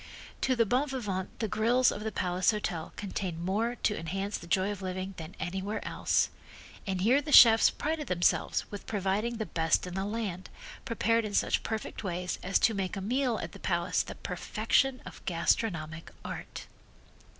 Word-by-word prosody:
To 260 - +2
the 230 -1 +3
bon 260 +7 +1
vivant 200 -8 -3
the 220 - -1
grills 240 +5 +3
of 210 - -5
the 220 - -2
Palace 180 -1 +1
Hotel 195 -6 -2
contained 190 -4 -4
more 225 +6 0
to 210 - +2
enhance 195 +5 -3
the 170 - -7
joy 190 +3 +2
of 200 -1 -6
living 185 +1 -4
than 160 +1 -8
anywhere 190 +6 -3
else, - - +1 0.6
and 190 -2 -1
here 250 +8 +4
the 295 +1 -6
chefs 225 -5 +9
prided 305 0 -3
themselves 175 -1 +1
with 205 - -8
providing 210 +3 -1
the 220 - -2
best 160 -2 +1
in 180 - -6
the 190 +1 -2
land, 205 -4 -4 0.4
prepared 230 0 +1
in 205 -1 -4
such - - +2
perfect 220 0 -4
ways 180 -1 -3
as 195 +2 +2
to 225 - +3
make 195 -1 -2
a - - -2
meal 245 +4 0
at - - -6
the 200 - -12
Palace 175 -2 +1
the - - -7
perfection 270 -2 0
of - - -11
gastronomic 165 -2 0 0.2
art. - - -6
200 Hz, 180 wpm, -30 LUFS, 180-230 Hz, 0.6 s, chefs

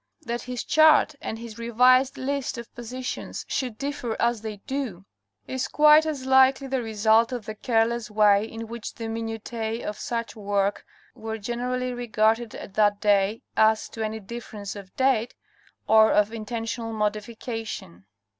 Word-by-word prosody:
That 240 -2 -3
his 250 -1 -5
chart 310 0 +5
and 220 - -4
his 230 0 -9
revised 250 +3 +4
list 275 -1 -2
of 235 -1 -9
positions 250 +2 -6
should 250 -5 -2
differ 275 -5 -4
as 235 -2 +1
they 215 -2 -5
do, 250 -10 -4 0.4
is 260 -1 -3
quite 300 +1 +6
as 285 -4 -3
likely 265 +1 +5
the 265 -1 -1
result 220 +1 +3
of 245 -4 -4
the 215 - -5
careless 230 +1 0
way 210 -1 +4
in 225 0 -7
which 235 0 -7
the 230 - -7
minutiz 225 0 -4
of 210 - -5
such 235 -1 -3
work 200 -1 -1 0.3
were 220 0 -5
generally 250 +3 -2
regarded 225 -1 0
at 195 - -9
that 205 0 +3
day, 205 +1 +2
as 220 0 +3
to 225 - -5
any 220 0 -3
difference 210 -1 -7
of 195 -2 -10
date, 260 -3 +2 0.5
or 220 0 +6
of 210 +1 +3
intentional 225 +1 -4
modification. 215 - -4
225 Hz, 155 wpm, -25 LUFS, 215-250 Hz, 0.5 s, quite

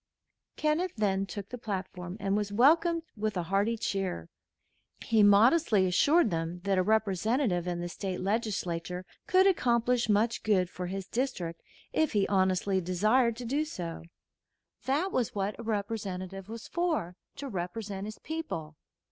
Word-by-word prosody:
Kenneth 320 +4 0
then 195 -2 +1
took 200 +2 -7
the 250 - -7
platform 185 -3 -5
and 195 -1 0
was 205 -1 -1
welcomed 325 - +4
with 215 -2 -2
a 175 - 0
hearty 200 +6 +1
cheer. 190 - -2 0.7
He 225 -2 +3
modestly 210 - +5
assured 265 - +4
them 165 +1 -3
that 195 -1 +2
a - - +5
Representative 215 -1 +1
in 175 -1 -2
the 175 - -3
State 185 +2 -4
Legislature 185 -4 -2 0.2
could 375 +1 +5
accomplish 240 - +2
much 220 +3 +2
good 185 -4 +2
for 180 0 -5
his 190 +1 -4
district 210 -10 -3 0.3
if 315 -4 +1
he 205 -2 +2
honestly 190 0 +2
desired 215 +7 +2
to 245 +1 -7
do 280 +6 0
so. 175 - -6 0.8
That 300 +9 +1
was 245 - -1
what 200 +2 -2
a - - -6
Representative 200 -3 -4
was 225 0 -7
for 320 - -1 0.2
to 280 - -6
represent 195 0 -4
his 215 - -7
people. 165 - -5
205 Hz, 150 wpm, -30 LUFS, 185-240 Hz, 0.8 s, modestly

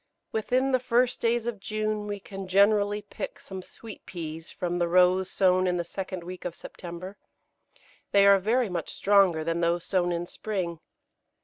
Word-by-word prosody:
] - - -54
Within 255 +5 +1
the 255 - +3
first 250 0 +1
days 235 0 +1
of 235 -4 -3
June 215 +1 -2
we 205 -1 -4
can 195 -1 -8
generally 205 +2 +3
pick - - -7
some 190 -1 -8
Sweet 220 +3 -9
Peas 165 -2 -6
from 175 0 -3
the 175 - +2
rows 180 +1 +4
sown 185 -1 +3
in 180 0 +1
the 175 - -1
second 185 0 -5
week 180 +1 -8
of 175 -1 -4
September. 180 +4 -9 0.9
They 200 0 +6
are 200 0 +7
very 230 +5 +1
much 180 -3 -4
stronger 195 -6 +3
than 165 +1 -1
those 170 0 +1
sown 180 -2 +1
in 170 0 -2
spring. 175 -4 -4
190 Hz, 180 wpm, -27 LUFS, 175-210 Hz, 0.9 s, are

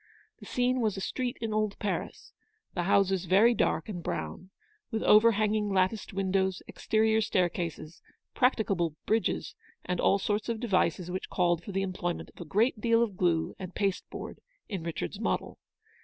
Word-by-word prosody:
The - - -12
scene 250 +1 +1
was 215 -3 0
a - - -2
street 245 +5 -3
in 225 -2 -2
old 215 -1 0
Paris, 205 -2 -4 0.4
the 180 - -1
houses 190 -1 +2
very 205 +7 +5
dark - - 0
and 185 -5 -5
brown, 185 +2 -5 0.4
with 225 -2 -2
over 225 +2 +6
hanging 210 0 +1
latticed 190 +2 +1
windows, 190 -1 0
exterior 220 0 +1
stair 185 -4 +2
cases, 165 -1 -6 0.3
practicable 195 - +1
bridges, 220 0 0 0.3
and 180 - -2
all - - +4
sorts 210 +3 -1
of 230 -1 -1
de 240 - -3
vices 180 -3 +1
which 185 - -4
called 175 -2 +1
for 200 - -7
the 195 0 0
employment 180 -2 -3
of - - -12
a - - -6
great 220 +2 +2
deal 230 0 +4
of 210 -5 -3
glue 170 -3 +1
and 185 -1 -7
pasteboard 195 -2 -3 0.3
in 195 -5 -4
Richard's 170 +4 -4
model. 225 - -2
195 Hz, 170 wpm, -29 LUFS, 180-220 Hz, 0.4 s, over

